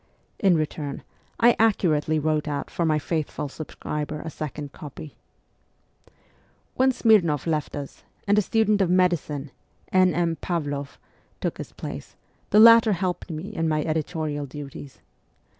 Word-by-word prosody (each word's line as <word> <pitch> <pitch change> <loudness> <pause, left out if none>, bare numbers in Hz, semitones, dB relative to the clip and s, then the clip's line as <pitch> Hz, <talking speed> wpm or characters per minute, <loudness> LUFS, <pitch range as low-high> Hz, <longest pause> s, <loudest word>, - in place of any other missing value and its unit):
In 190 -3 +4
return, 150 -2 -4 0.4
I 235 +1 +6
accurately 160 -8 +2
wrote 155 0 0
out 145 -2 -3
for 170 - -1
my 155 -1 +3
faithful 150 -1 -3
subscriber 150 0 -5
a 160 - -6
second 150 -2 -6
copy. 150 0 -10 1.6
When 260 +1 +3
Smirnoff 200 - +3
left 155 -3 -1
us, 145 -1 -8 0.2
and 205 - +4
a 210 - +4
student 215 0 +2
of 185 - +2
medicine, 170 -6 +1 0.4
N. 185 -1 +4
M. 170 -1 0
Pavloff, 145 -4 -3 0.4
took - - -3
his - - -7
place, - - -8 0.3
the 210 - +5
latter 230 -1 +8
helped 185 0 -3
me 160 +4 -5
in 165 -4 0
my 155 -1 +1
editorial 155 -2 -2
duties. 140 0 -9
155 Hz, 140 wpm, -25 LUFS, 150-185 Hz, 1.6 s, latter